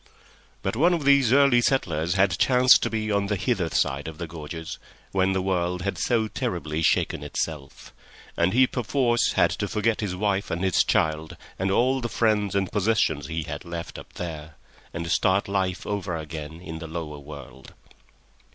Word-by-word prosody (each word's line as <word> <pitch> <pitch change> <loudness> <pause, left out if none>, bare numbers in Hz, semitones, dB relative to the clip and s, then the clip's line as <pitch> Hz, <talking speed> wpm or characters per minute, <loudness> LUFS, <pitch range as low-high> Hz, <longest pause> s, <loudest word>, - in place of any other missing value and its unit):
But 95 - -1
one 170 +8 +4
of 155 -4 -4
these 140 -4 +5
early 135 -3 +5
settlers 85 - 0
had 95 -3 +2
chanced 125 0 +6
to - - 0
be 110 -1 -2
on 100 -1 +1
the 105 - 0
hither 95 -3 0
side 70 0 0
of 80 -1 -7
the 85 - -4
gorges 80 0 -7 0.3
when 95 0 +2
the 95 -1 -1
world 90 -1 -1
had 100 - -2
so 115 -3 +1
terribly 75 -6 -3
shaken - - +1
itself, 75 -4 -5 0.4
and 85 +2 +2
he 130 +4 +5
perforce 125 -1 +1
had - - +3
to - - -2
forget 110 +1 0
his 100 -4 -2
wife 100 0 -1
and 85 +2 -2
his 95 -2 +3
child 80 0 0 0.2
and 95 +1 0
all 130 +6 +2
the 120 - -3
friends 105 -4 +1
and 95 -2 0
possessions 100 -8 +1
he 80 -1 -3
had 75 0 -6
left 85 -1 -6
up - - -14
there, 80 -3 -7 0.4
and 85 +1 -5
start 95 +1 +2
life 95 -2 -1
over 95 -4 -3
again 80 0 -7
in 80 -3 -7
the 80 - -7
lower 80 -2 -6
world. 70 -3 -12
95 Hz, 180 wpm, -25 LUFS, 80-110 Hz, 0.4 s, chanced